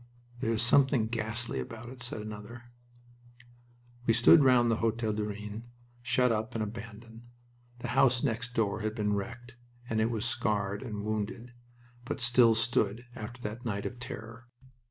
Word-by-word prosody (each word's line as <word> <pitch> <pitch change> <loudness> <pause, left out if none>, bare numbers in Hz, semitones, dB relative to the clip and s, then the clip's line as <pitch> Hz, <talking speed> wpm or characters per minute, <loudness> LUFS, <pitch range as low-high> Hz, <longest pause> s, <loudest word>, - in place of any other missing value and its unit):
"There 115 - 0
is 115 0 +1
something 130 -1 +4
ghastly 110 - -2
about 115 - -7
it," 130 0 -11
said 120 -2 -1
another. 110 +3 -9 1.4
We 115 - +5
stood 140 +6 +7
round 125 -3 +5
the 115 - +2
Hotel 115 -1 0
du 105 0 -1
Rhin, 105 +2 -6 0.4
shut 125 0 +2
up 110 +2 -2
and 110 - 0
abandoned. 115 +1 -9 0.5
The - - -4
house 125 -2 +3
next 125 -1 -2
door 105 -2 +1
had 110 0 -2
been 105 -2 0
wrecked, 120 +4 -5 0.3
and 110 -2 0
it 110 - +2
was 115 -1 -2
scarred 105 -5 0
and 105 -5 -5
wounded, 110 +3 -3 0.5
but 135 +3 -4
still 120 -2 +5
stood 115 0 +1
after 120 +1 -8
that 110 +4 -5
night 100 -4 -3
of 125 - -5
terror. 115 0 -8
115 Hz, 160 wpm, -30 LUFS, 110-120 Hz, 1.4 s, stood